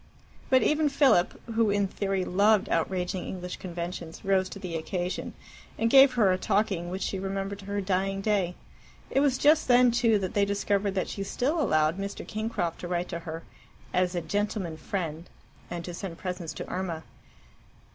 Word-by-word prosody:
But 260 -1 +5
even 305 0 +3
Philip, 275 -10 +3
who 225 -1 +3
in 200 -1 +2
theory 195 -1 -1
loved 205 +3 +3
outraging 180 +2 -1
English 180 -1 -6
conventions, 170 -1 -6
rose 190 -1 +2
to - - -8
the 180 -4 -5
occasion, 175 +3 -3 0.4
and 230 0 +1
gave 270 -1 +8
her 215 -6 +4
a 185 - 0
talking 195 -4 0
which 190 +2 -3
she 195 - -2
remembered 195 +1 -3
to 195 - -11
her 200 0 -2
dying 195 +1 0
day. 195 -4 0 0.6
It - - +3
was 275 -2 +3
just 305 +3 +4
then, 250 -1 +6
too, 230 -2 +3
that 190 -2 -3
they 205 - +3
discovered 200 0 0
that 185 - 0
she 200 - -5
still 270 +11 0
allowed 155 - +2
Mr. 200 0 -5
Kingcroft 215 -6 -2
to 175 - -5
write 175 0 -2
to 170 - -4
her 165 -1 -7 0.5
"as 180 0 +1
a 175 - 0
gentleman 205 -3 -2
friend," 165 -1 -4 0.4
and 170 -1 -5
to 175 - -6
send 175 -1 -6
presents 180 -3 -5
to - - -6
Irma. 175 -4 -3
195 Hz, 180 wpm, -28 LUFS, 175-210 Hz, 0.6 s, gave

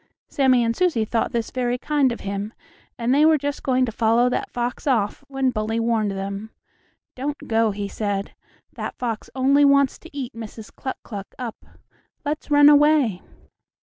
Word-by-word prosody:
Sammie 260 -3 +3
and 230 0 0
Susie 330 -12 +1
thought 225 +1 -1
this 230 -1 -2
very 245 -1 -1
kind 285 -1 +1
of 235 - -6
him, 200 +2 -4 0.4
and 240 +2 +1
they 290 +2 +4
were 315 0 +6
just 285 0 -3
going 255 -1 +2
to 235 - -4
follow 230 +2 +3
that - - -2
fox 245 +4 -3
off 230 -1 +1
when 270 -2 0
Bully 220 0 -2
warned 225 -2 +1
them: 195 +2 -5 0.7
"Don't 285 +3 -4
go," 225 0 +2
he 205 0 -3
said; 200 -1 -3 0.4
"that - - -5
fox 230 -3 -4
only 275 +2 +4
wants 280 -1 +4
to 330 - -13
eat 255 -3 -4
Mrs. 225 -1 -9
Cluck 260 - -5
Cluck 200 -3 -8
up. 240 -3 -6 0.6
Let's 300 +2 -3
run 290 0 +7
away." 295 -8 +5
245 Hz, 175 wpm, -23 LUFS, 220-280 Hz, 0.7 s, run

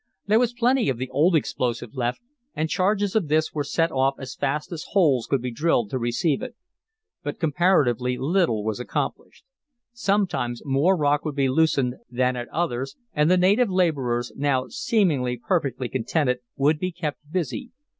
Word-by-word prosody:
There 215 +2 +4
was 240 -1 +1
plenty 245 - +2
of 130 - -1
the 130 +1 -5
old 160 +7 +3
explosive 120 -5 -1
left 125 -1 -2 0.3
and 155 - 0
charges 200 +3 +1
of 205 -8 +2
this 155 +1 +1
were 150 - -1
set 165 +3 0
off 135 0 +1
as 130 -1 -7
fast 150 +4 -2
as 165 -3 -5
holes 150 - +3
could 135 -3 0
be 125 - -2
drilled 120 -5 +1
to 130 - -1
receive 120 +6 0
it. 250 -2 -6 0.7
But 145 0 -5
comparatively 145 - +2
little 145 - +1
was 110 +1 -2
accomplished. 125 - -4 0.5
Sometimes 195 - -1
more 145 +8 +3
rock 145 -1 +2
would 155 -3 -4
be 135 -2 +2
loosed 160 +2 +3 0.3
than 125 +1 +1
at 120 -1 -5
others, 135 -6 -2 0.2
and 150 +2 +2
the 185 - +5
native 200 +6 +3
laborers, 140 -10 0
now 135 -2 0
seemingly 165 - +1
perfectly 135 - -1
contented, 125 +1 0 0.2
would 150 +2 +2
be 185 +2 -2
kept 165 -4 -4
busy. 185 - -3
145 Hz, 170 wpm, -24 LUFS, 125-180 Hz, 0.7 s, the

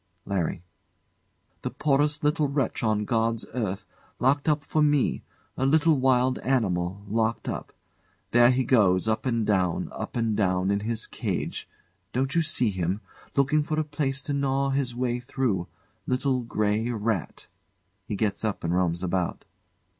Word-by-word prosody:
LARRY. 90 -3 -2 1.0
The - - -2
poorest 150 +1 +1
little 150 0 +2
wretch 140 -3 -1
on 110 -2 +1
God's 115 0 0
earth 105 -6 -2 0.3
locked 140 +4 +2
up 150 -1 +1
for 155 +2 0
me! 145 -2 +2 0.3
A 130 - +1
little 160 +2 +4
wild 130 -1 +2
animal, 100 -6 0
locked 110 +1 0
up. - - -4 0.6
There 120 0 +6
he 130 +1 +2
goes, 105 -6 +3
up 110 +4 0
and 115 -3 +1
down, 95 -5 +1
up - - -6
and 115 -3 +1
down 95 -2 +1
in 100 - +1
his 110 +2 -2
cage - - -3 0.4
don't 130 +2 0
you 170 - +3
see 125 -8 +1
him? 95 +2 -2 0.3
looking 140 +2 +3
for 155 +1 -1
a - - +2
place 145 -2 -2
to 145 - -3
gnaw 140 0 +1
his 135 -3 -1
way 125 -1 -1
through 120 -8 -1 0.4
little 130 0 +1
grey 110 -1 0
rat. 110 -5 -2 0.6
[He 105 - -2
gets 105 0 -1
up 110 -2 -2
and 85 +1 0
roams 90 -1 +1
about. 90 -1 -1
120 Hz, 155 wpm, -26 LUFS, 100-135 Hz, 1.0 s, There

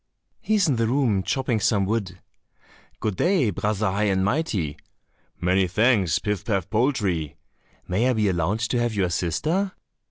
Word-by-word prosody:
"He 215 - 0
is 200 -5 +3
in 135 -5 +1
the 115 0 +1
room 120 -6 +1
chopping 125 +2 -1
some 100 -2 +2
wood." 100 -3 -2 0.8
"Good 105 -4 -2
day, 175 - +2
Brother 105 +1 -1
High 105 +2 0
and 95 -2 +1
Mighty." 100 - -1 0.6
"Many 90 +1 +2
thanks, 105 - +2
Pif 105 -3 -2
paf 100 -7 -1
poltrie." 105 - 0 0.5
"May 110 +8 +1
I - - +3
be 110 -3 +1
allowed 95 +4 0
to 120 +1 0
have 120 -2 -1
your 95 -3 0
sister?" 160 - -1
105 Hz, 160 wpm, -24 LUFS, 95-125 Hz, 0.8 s, is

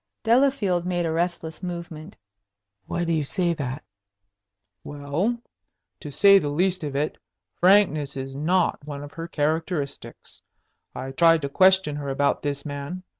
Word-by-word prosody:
Delafield 230 -7 +2
made 175 -1 -1
a 165 - -1
restless 165 -1 -2
movement. 170 -1 -7 0.7
"Why 175 - -2
do 165 -1 0
you 155 -2 +1
say 175 +4 0
that?" 140 -2 -5 1.0
"Well, 145 +11 -2 0.6
to 150 - -8
say 200 +7 +6
the 145 - -3
least 180 +4 0
of 145 -2 -4
it, 150 +2 -2 0.4
frankness 170 -7 +3
is 135 0 -5
not 165 +4 0
one 145 -1 -7
of 145 - -10
her 165 0 -6
characteristics. 155 -1 -3 0.5
I 135 - -5
tried 165 +2 +4
to 140 - -2
question 185 -2 +3
her 140 -1 -5
about 140 +1 0
this 140 -1 -3
man. 145 +5 -6
160 Hz, 145 wpm, -24 LUFS, 145-180 Hz, 1.0 s, say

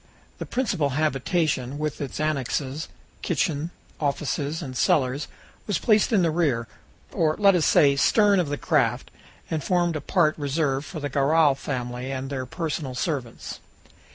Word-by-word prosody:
The - - -5
principal 200 - 0
habitation, 145 -2 0
with 150 -1 -3
its 140 0 -5
annexes 145 0 -2 0.3
kitchen, 155 -1 -1 0.3
offices, 145 +2 -2
and 130 -4 -7
cellars 135 +2 +1 0.4
was 205 -5 +1
placed 215 +3 +3
in 200 -5 +4
the 165 - +2
rear 140 -9 0 0.4
or, 155 -1 +1
let 200 -1 +5
us 175 -4 +2
say, 140 -1 +5
stern 200 +7 +4
of 170 -5 0
the 145 - -2
craft - - 0 0.4
and 155 -3 -1
formed 175 -1 +1
a 155 - -3
part 155 0 +2
reserved 145 -1 -1
for 160 - -6
the 145 - -2
Garral 145 +2 +4
family 125 -1 -4
and 135 +1 -4
their 130 -2 -3
personal 150 -4 -4
servants. 130 -4 -4
150 Hz, 155 wpm, -25 LUFS, 135-165 Hz, 0.4 s, let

